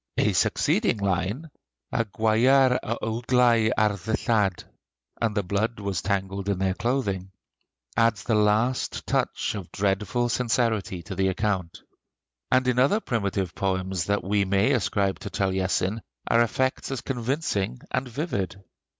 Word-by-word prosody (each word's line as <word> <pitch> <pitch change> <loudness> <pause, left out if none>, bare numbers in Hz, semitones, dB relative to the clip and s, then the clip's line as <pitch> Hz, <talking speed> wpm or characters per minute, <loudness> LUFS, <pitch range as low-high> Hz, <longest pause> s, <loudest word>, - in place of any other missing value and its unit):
A - - +2
succeeding - - +2
line, 100 - -2 0.4
"A 115 - +1
gwyar 120 +6 +3
a 115 - -3
uaglei 115 0 +3
ar 110 -1 +4
ddillad," 105 0 0 0.6
(And 110 -3 0
the 100 - +1
blood 105 +5 -1
was 100 -4 -2
tangled 100 0 -2
in 100 - +1
their 95 0 +1
clothing), 100 -5 -1 0.7
adds 115 -4 +2
the 115 - 0
last 110 +4 +1
touch - - 0
of 100 -5 -7
dreadful 105 +4 0
sincerity 115 -7 0
to 85 - -7
the 95 0 +1
account. 95 -3 -2 0.7
And 130 0 +3
in 125 0 +2
other 140 +12 +4
primitive 100 - -2
poems 95 -2 -1
that 100 +2 0
we 100 +1 +1
may 100 +6 +2
ascribe 100 -5 0
to - - -6
Taliesin 95 +2 0 0.3
are 115 - +4
effects 130 +3 0
as 135 -3 -3
convincing 120 - -2
and 130 +1 -1
vivid. 120 - -3
105 Hz, 140 wpm, -25 LUFS, 95-120 Hz, 0.7 s, ar